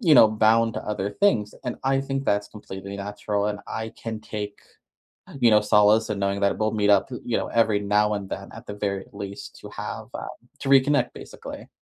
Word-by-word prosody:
you 165 -9 +5
know, 110 - +9
bound 110 +1 +3
to - - -4
other 105 -1 -1
things. 110 - +2
And 125 - -3
I 135 0 +2
think 135 0 -3
that's 100 0 +2
completely 100 -2 -8
natural, 105 +1 -2
and 105 -1 -2
I 110 0 -4
can 110 -1 -6
take, 105 -2 -6 0.8
you 120 -2 +6
know, 105 - +7
uh, 105 - +4
solace 105 +1 +4
in 105 - -1
knowing 100 0 0
that 100 0 +2
we'll 110 0 +1
meet 105 -1 +1
up, 100 +4 +4
p 125 - -6
you 120 - 0
know, - - -2
every 110 -3 +2
now 105 +1 +2
and 100 -2 -4
then - - -6
at - - -11
the 105 - -6
very 100 -2 -2
least 100 -1 -8
to - - -9
have - - -6
um - - -5 0.3
to 135 - -3
reconnect, 140 0 +4
basically. - - -9
105 Hz, 220 wpm, -25 LUFS, 100-115 Hz, 0.8 s, know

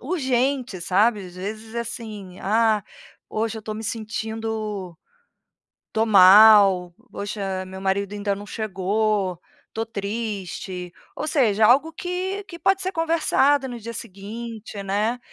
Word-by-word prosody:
urgente, 260 - -1
sabe. 200 +2 +2
Às 175 - -13
vezes, 215 +4 -6
assim: 215 -5 -6
"Ah, 220 0 +2 0.5
hoje 220 +1 -2
eu - - -8
estou 215 0 -6
me 220 +1 -6
sentindo 220 -4 -4 0.9
estou 220 - +1
mal, 195 -2 +7 0.2
poxa, 195 -2 -4
meu 190 0 -9
marido 195 +1 -1
ainda 205 -1 -1
não 205 +1 -9
chegou, 205 -3 -1 0.3
estou 225 +1 -3
triste." 200 -4 -5 0.2
Ou - - -3
seja, 225 -8 +3
algo 285 +8 +4
que 370 +4 -3
que 340 -3 -10
pode 385 0 +2
ser 375 +1 -2
conversado 315 -4 +2
no 240 - -6
dia 230 +2 -6
seguinte, 215 +1 -7
né, 210 +5 0
215 Hz, 130 wpm, -23 LUFS, 195-235 Hz, 0.9 s, mal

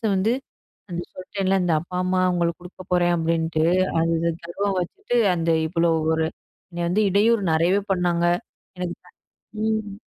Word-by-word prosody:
வந்து 210 +5 +2 0.6
அந்த 175 0 -3
சொல்ட்டேன்ல, 190 +1 -1
இந்த 170 -2 +2
"அப்பா, 180 +1 -9
அம்மா 185 0 +1
அவுங்களுக்கு 175 -1 0
குடுக்க 180 +1 -11
போறேன்"அப்படின்ட்டு, 165 -2 +1 0.4
அது 165 0 +1
இத 170 0 +1
கருவம் 195 +3 -2
வச்சுட்டு 245 - -3 0.2
அந்த 165 0 -1 0.2
இவ்ளோ 170 0 +1 0.2
ஒரு 160 0 +1 0.4
என்னை 175 0 -3
வந்து 210 +5 +2
இடையூறு 215 +2 +3
நெறையவே 175 +5 +3
பண்ணாங்க, 175 -1 +1 0.5
எனக்கு 180 -1 -3
த - - -17 0.5
ம். 220 -2 -1
175 Hz, 145 wpm, -23 LUFS, 170-195 Hz, 0.6 s, இடையூறு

